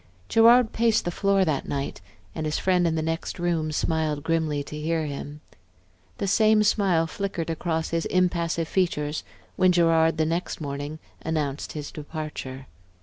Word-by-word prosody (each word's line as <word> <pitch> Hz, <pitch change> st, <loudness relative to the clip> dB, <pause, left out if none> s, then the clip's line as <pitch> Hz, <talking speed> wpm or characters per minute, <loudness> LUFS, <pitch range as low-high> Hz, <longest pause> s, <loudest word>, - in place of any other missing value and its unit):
Gerard 230 Hz, +1 st, +6 dB
paced 230 Hz, -1 st, +2 dB
the 175 Hz, -, -1 dB
floor 195 Hz, +1 st, +2 dB
that 150 Hz, -5 st, -1 dB
night, 140 Hz, -8 st, -3 dB, 0.3 s
and 155 Hz, -, -3 dB
his 150 Hz, -, -1 dB
friend 180 Hz, -2 st, +2 dB
in 160 Hz, -, 0 dB
the 160 Hz, -, -1 dB
next 165 Hz, +1 st, -3 dB
room 170 Hz, -3 st, 0 dB
smiled 155 Hz, -1 st, -1 dB
grimly 160 Hz, -3 st, 0 dB
to 150 Hz, -, -9 dB
hear 160 Hz, +1 st, -1 dB
him. 145 Hz, +1 st, -6 dB, 0.8 s
The -, -, -2 dB
same 215 Hz, +2 st, +4 dB
smile 195 Hz, -6 st, +2 dB
flickered 170 Hz, -1 st, -3 dB
across 160 Hz, 0 st, -2 dB
his 165 Hz, 0 st, -1 dB
impassive 170 Hz, -3 st, +1 dB
features 155 Hz, -5 st, 0 dB, 0.3 s
when 185 Hz, 0 st, +5 dB
Gerard, 165 Hz, -2 st, +3 dB
the 155 Hz, -, +2 dB
next 165 Hz, +3 st, -2 dB
morning, 145 Hz, 0 st, -5 dB, 0.3 s
announced 150 Hz, -3 st, -2 dB
his 150 Hz, -2 st, -6 dB
departure. 150 Hz, -4 st, -6 dB
165 Hz, 155 wpm, -25 LUFS, 150-180 Hz, 0.8 s, Gerard